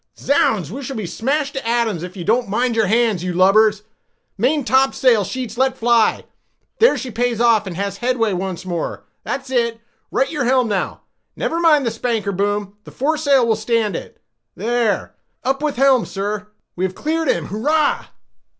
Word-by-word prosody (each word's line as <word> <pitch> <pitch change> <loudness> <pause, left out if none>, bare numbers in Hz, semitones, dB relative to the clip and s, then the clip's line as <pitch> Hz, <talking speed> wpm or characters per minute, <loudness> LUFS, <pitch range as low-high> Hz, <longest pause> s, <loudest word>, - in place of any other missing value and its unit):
Zounds! 215 - +1
we 270 +6 -6
shall 270 0 -6
be 215 -4 -4
smashed 275 - -1
to 270 -4 -5
atoms 230 -7 0
if 180 +2 -8
you 175 - -5
don't 235 +4 +1
mind 240 +3 0
your 220 -2 +2
hands, 220 -4 +2
you 180 -1 -2
lubbers—main 215 - +1
topsail 260 -4 +3
sheets 240 +2 -5
let 265 0 +2
fly—there 240 - +1
she 255 - -5
pays 240 0 -1
off, 230 -4 +3
and 180 - -5
has 200 +1 -3
headway 240 -3 0
once 185 -1 -4
more, 175 -3 -4 0.2
that's 270 -1 -4
it—right 235 +1 -2
your 285 -5 -1
helm 255 -1 +3
now—never 210 - -4
mind 305 -5 +4
his 230 - -1
spanker 225 -3 -1
boom, 205 +1 -2
the - - -12
fore 300 +5 0
stay 285 -3 +3
will 230 -2 +2
stand 215 -2 0
it—there—up 220 - -4
with 300 -1 -1
helm, 265 -1 +3
sir—we 205 -1 -6
have 190 0 -1
cleared 320 +1 -1
him—hurrah!" 260 - 0
230 Hz, 155 wpm, -19 LUFS, 200-260 Hz, 0.2 s, mind